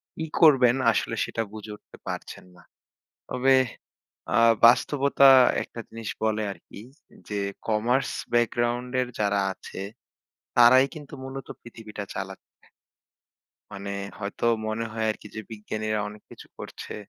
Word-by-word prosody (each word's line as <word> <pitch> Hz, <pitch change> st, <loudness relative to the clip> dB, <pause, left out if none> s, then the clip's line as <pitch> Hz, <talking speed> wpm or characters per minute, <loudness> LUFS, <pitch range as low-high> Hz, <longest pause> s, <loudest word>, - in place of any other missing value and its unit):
কি 160 Hz, -, -4 dB, 0.2 s
করবেন 130 Hz, -6 st, +6 dB, 0.2 s
আসলে 110 Hz, -, -1 dB
সেটা 115 Hz, -, -3 dB
বুঝে 110 Hz, 0 st, -8 dB
উঠতে 105 Hz, -, -18 dB
পারছেন -, -, -6 dB
না। -, -, -17 dB, 0.7 s
তবে 130 Hz, +1 st, +3 dB, 0.8 s
আ -, -, +4 dB, 0.3 s
বাস্তবতা 135 Hz, +3 st, +5 dB, 0.3 s
একটা 115 Hz, -, -11 dB
জিনিস 115 Hz, -3 st, -7 dB
বলে 110 Hz, 0 st, +1 dB
আরকি 100 Hz, -, -12 dB, 0.5 s
যে 105 Hz, -, -2 dB, 0.3 s
কমার্স 115 Hz, +5 st, +1 dB, 0.2 s
ব্যাকগ্রাউন্ডের 120 Hz, +2 st, 0 dB
যারা 100 Hz, -1 st, +1 dB
আছে 95 Hz, -, -9 dB, 0.8 s
তারাই 130 Hz, +3 st, +7 dB
কিন্তু 150 Hz, -2 st, -11 dB
মূলত 135 Hz, 0 st, -7 dB
পৃথিবীটা 110 Hz, -3 st, -9 dB
চালাচ্ছে। 95 Hz, 0 st, -9 dB, 1.1 s
মানে 100 Hz, 0 st, -6 dB, 0.3 s
হয়তো 100 Hz, +2 st, -5 dB, 0.2 s
মনে 110 Hz, +1 st, -2 dB
হয় 110 Hz, -1 st, -1 dB
আরকি 105 Hz, -, -7 dB
যে -, -, -3 dB
বিজ্ঞানীরা 110 Hz, 0 st, -3 dB
অনেক 105 Hz, 0 st, -12 dB
কিছু -, -, -12 dB
করছে -, -, -8 dB
115 Hz, 125 wpm, -26 LUFS, 105-125 Hz, 1.1 s, তারাই